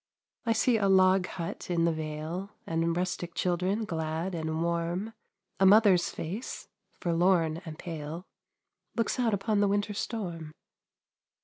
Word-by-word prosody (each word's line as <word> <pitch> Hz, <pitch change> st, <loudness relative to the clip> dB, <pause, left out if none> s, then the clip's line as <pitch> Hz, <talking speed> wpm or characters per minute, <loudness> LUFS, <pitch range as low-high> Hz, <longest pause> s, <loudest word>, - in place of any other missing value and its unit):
I 230 Hz, -, +4 dB
see 230 Hz, +1 st, +3 dB
a 200 Hz, -2 st, +2 dB
log 185 Hz, -1 st, +5 dB
hut 170 Hz, 0 st, -6 dB
in 170 Hz, -1 st, +2 dB
the 170 Hz, -, +3 dB
vale, 155 Hz, +4 st, -4 dB, 0.2 s
And 165 Hz, +1 st, 0 dB
rustic 180 Hz, -1 st, -2 dB
children 185 Hz, +5 st, 0 dB
glad 160 Hz, +1 st, -2 dB
and 160 Hz, -1 st, -2 dB
warm; 170 Hz, +5 st, -1 dB, 0.5 s
A 195 Hz, -, +5 dB
mother's 200 Hz, -3 st, +6 dB
face, 195 Hz, +10 st, -5 dB, 0.3 s
forlorn 170 Hz, -1 st, +2 dB
and 155 Hz, -2 st, -7 dB
pale, 160 Hz, +1 st, -6 dB, 0.7 s
Looks 230 Hz, +2 st, 0 dB
out 230 Hz, -4 st, +2 dB
upon 205 Hz, +1 st, 0 dB
the 205 Hz, -, +4 dB
winter 205 Hz, +1 st, 0 dB
storm. 175 Hz, -8 st, -4 dB
180 Hz, 135 wpm, -29 LUFS, 165-200 Hz, 0.7 s, mother's